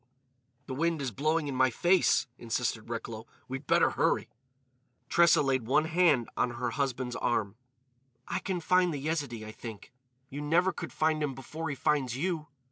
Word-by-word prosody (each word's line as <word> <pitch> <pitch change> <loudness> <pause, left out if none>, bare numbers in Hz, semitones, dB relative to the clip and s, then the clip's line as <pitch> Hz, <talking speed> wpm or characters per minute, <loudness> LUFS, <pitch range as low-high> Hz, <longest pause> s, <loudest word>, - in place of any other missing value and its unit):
"The 130 - -5
wind 165 +3 0
is 135 -3 -2
blowing 155 +6 0
in 140 - -3
my 130 0 +4
face," 175 +5 +3
insisted 115 -1 -2
Recklow. 115 -1 -5 0.2
"We'd 135 +2 -6
better - - +4
hurry." - - +1 0.8
Tressa 170 -3 +5
laid 130 -4 0
one 150 +5 +3
hand 160 -7 +3
on 120 -1 0
her 125 +1 -2
husband's 130 -3 -2
arm. 110 -4 0 0.7
"I - - -1
can 185 -2 -3
find 180 +1 +3
the 150 - -3
Yezidee, 140 -7 -3
I 110 - -7
think. 110 0 -10 0.3
You 140 +2 -6
never 170 +5 +2
could - - -6
find 155 0 +1
him 140 -3 -1
before 155 +5 -6
he 145 - -3
finds 135 -3 0
you! 160 -1 -2
140 Hz, 170 wpm, -30 LUFS, 125-160 Hz, 0.8 s, Tressa